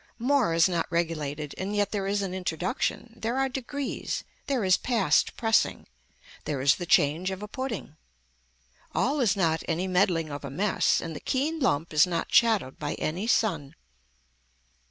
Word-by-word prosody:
More 245 -7 +2
is 165 +2 +5
not 170 -3 -1
regulated 155 -4 -2
and 200 +2 -3
yet 205 -1 +1
there 200 -2 -2
is 200 0 0
an 185 -2 -3
introduction, 185 - -2
there 235 +2 -2
are 270 0 +2
degrees, 265 +2 -4 0.2
there 270 -6 0
is 185 -1 +5
past 215 - +1
pressing, 225 -1 +1 0.6
there 145 -3 -2
is 140 +2 +4
the 175 - -5
change 160 +5 +3
of 190 +1 -5
a - - -5
pudding. 225 - -5 1.0
All 285 +3 +1
is 220 -7 +3
not 165 -4 +1
any 175 +3 -1
meddling 180 -4 +1
of 145 0 -6
a 140 - -5
mess 190 +9 +1
and 165 -1 -6
the - - -5
keen 300 +5 -1
lump 165 - 0
is 155 +4 +5
not 170 -2 -3
shadowed 220 - +3
by - - -3
any 180 +8 -3
sun. 165 - +1
185 Hz, 170 wpm, -27 LUFS, 160-230 Hz, 1.0 s, is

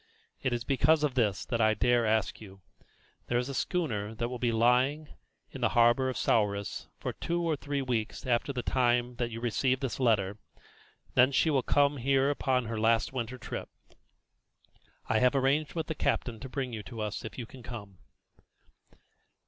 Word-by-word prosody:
It 130 - 0
is 120 -1 -1
because 150 +4 +3
of 145 -3 +1
this 110 -7 0
that 115 -1 -1
I 110 0 +4
dare 120 +2 +2
to - - +1
ask 110 0 0
you. 95 -2 -12 0.7
There 120 - +1
is 125 +2 -1
a - - -4
schooner 115 - -2
that 120 +2 -2
will 125 -1 -5
be 120 -1 +1
lying 125 +6 +2 0.4
in - - -8
the - - +3
harbour 120 +3 +5
of 130 - -4
Souris 100 -2 0
for - - -4
two 170 0 -2
or 165 -2 0
three 145 -1 -3
weeks 115 -4 -2
after 125 +2 +1
the 125 -3 -3
time 125 -1 +1
that 120 -1 -1
you 115 0 -6
receive 125 +2 +1
this 135 -3 -3
letter. 105 -5 +1 0.7
Then 130 +2 +5
she 155 +4 +3
will 135 -3 +3
come 145 +3 +2
here 135 +2 +2
upon 130 -3 0
her 115 0 -3
last 115 +3 +2
winter 125 0 -3
trip. - - -6 1.4
I 110 - +2
have 125 +3 +3
arranged 140 +3 +1
with 160 -2 -1
the 160 - -3
captain 120 -6 -1
to 130 - -8
bring 130 -2 -3
you 110 - -4
to 115 +2 -9
us 105 -1 -3
if 110 - -8
you 120 - -4
can 130 +2 -13
come." 105 -6 -9
125 Hz, 190 wpm, -30 LUFS, 115-135 Hz, 1.4 s, harbour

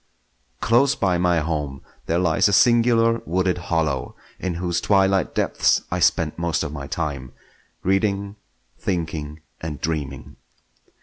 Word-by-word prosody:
Close 125 +5 +3
by 90 -4 +1
my 90 -2 +2
home 75 -4 -3 0.2
there 85 - +1
lies 85 0 +3
a 100 - 0
singular 115 +1 +4
wooded 90 +1 0
hollow, 80 -6 -1 0.2
in 90 -2 -3
whose 85 0 -1
twilight 95 -3 +2
deeps - - +2
I - - -1
spent 80 0 +1
most 85 -2 0
of 75 - -5
my 70 -2 -6
time; 70 -6 -4 0.5
reading, 100 +1 0 0.4
thinking, 80 -4 -3 0.2
and 80 -2 -5
dreaming. 75 -4 -4
85 Hz, 130 wpm, -22 LUFS, 75-95 Hz, 0.5 s, singular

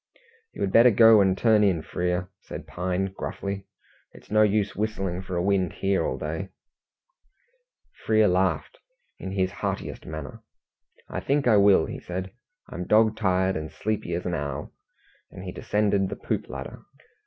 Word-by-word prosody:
"You - - -9
had 95 - 0
better 115 +5 +7
go 115 -1 +7
and 95 -1 +2
turn 110 -2 +4
in, 90 -6 +2
Frere," 90 +2 -2
said - - -9
Pine 95 +2 -2
gruffly. 100 0 -5 0.5
"It's - - -17
no 110 0 +4
use 105 -1 +2
whistling 95 -4 -2
for 95 -1 -6
a 85 - 0
wind 95 -3 +1
here 95 0 0
all - - -2
day." 80 +5 -4 1.5
Frere 110 -1 +4
laughed 90 +1 0 0.4
in 95 - -6
his 95 -1 0
heartiest - - -4
manner. 80 -2 -7 0.7
"I - - -4
think 140 -1 0
I 110 -3 +6
will," 100 -4 +5
he - - -6
said. 95 +2 -5 0.4
"I'm 90 0 -6
dog 110 0 +4
tired, 95 -2 +1
and 80 0 -4
as - - -21
sleepy 105 -5 -2
as 90 - -4
an 90 - -2
owl," 70 -2 -4 0.6
and 95 - -10
he 90 - -5
descended 100 -1 0
the - - -4
poop - - -3
ladder. - - -7
95 Hz, 165 wpm, -26 LUFS, 90-105 Hz, 1.5 s, better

